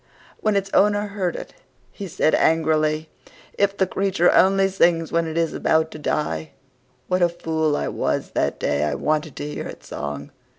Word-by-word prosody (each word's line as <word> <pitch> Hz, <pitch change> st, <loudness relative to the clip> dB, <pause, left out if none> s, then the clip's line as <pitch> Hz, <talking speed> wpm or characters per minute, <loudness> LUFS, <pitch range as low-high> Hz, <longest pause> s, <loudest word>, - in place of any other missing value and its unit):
When 215 Hz, -1 st, +1 dB
its 195 Hz, 0 st, -1 dB
owner 205 Hz, 0 st, +3 dB
heard 190 Hz, -4 st, -2 dB
it, -, -, -8 dB, 0.4 s
he 200 Hz, -, -7 dB
said 155 Hz, -, +1 dB
angrily, 155 Hz, -1 st, +2 dB, 0.5 s
"If 200 Hz, 0 st, +1 dB
the 190 Hz, -, +3 dB
creature 190 Hz, -2 st, +2 dB
only 195 Hz, 0 st, +4 dB
sings 170 Hz, -4 st, +2 dB
when 165 Hz, 0 st, +1 dB
it 160 Hz, 0 st, -4 dB
is 165 Hz, -1 st, +1 dB
about 160 Hz, 0 st, +1 dB
to 155 Hz, -, -9 dB
die, 150 Hz, +1 st, -2 dB, 0.5 s
what 185 Hz, 0 st, 0 dB
a 175 Hz, -, +5 dB
fool 160 Hz, -3 st, -1 dB
I -, -, -2 dB
was 70 Hz, -, -2 dB
that -, -, -1 dB
day 70 Hz, +1 st, 0 dB
I 75 Hz, -1 st, 0 dB
wanted 155 Hz, -1 st, -1 dB
to 145 Hz, -, -5 dB
hear 150 Hz, -, -5 dB
its -, -, -11 dB
song! 75 Hz, 0 st, -5 dB
165 Hz, 180 wpm, -22 LUFS, 155-195 Hz, 0.5 s, a